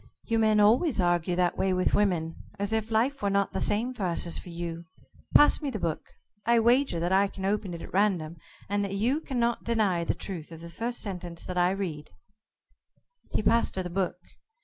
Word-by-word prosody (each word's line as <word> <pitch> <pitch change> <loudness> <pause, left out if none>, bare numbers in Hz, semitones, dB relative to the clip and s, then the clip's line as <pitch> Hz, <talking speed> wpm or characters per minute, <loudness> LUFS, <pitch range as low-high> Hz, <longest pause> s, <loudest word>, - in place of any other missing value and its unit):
"You 230 -1 0
men 215 -1 +4
always 230 - +4
argue 175 -1 +1
that 180 -1 +1
way 190 -1 +2
with 185 0 +1
women 175 -6 +1 0.2
as 200 +2 -2
if 220 0 -1
life 240 +5 +1
were 200 - +1
not 200 0 +1
the - - -2
same 230 +5 +1
for 225 - -9
us 175 -1 +1
as 170 - 0
for - - -11
you. 170 0 -5 0.5
Pass 295 - +6
me 290 - -2
the 255 - -3
book. 165 -5 -3 0.4
I 235 0 +4
wager 240 -4 +3
that 175 +2 -1
I 195 +1 +4
can 190 -1 -7
open 200 -3 -1
it 165 - -8
at - - -11
random, 180 -5 +1 0.3
and 205 +1 0
that 195 0 -3
you 250 +10 +1
cannot 240 -3 -1
deny 210 -7 +1
the - - -1
truth 175 -5 -6
of 165 0 -10
the 170 0 -9
first 235 +6 -4
sentence 180 -4 -6
I 180 -1 +2
read." 175 -6 -4 1.2
He - - 0
passed 230 +2 +2
her 190 - -1
the 180 - -6
book. 180 -1 -1
195 Hz, 210 wpm, -28 LUFS, 175-225 Hz, 1.2 s, Pass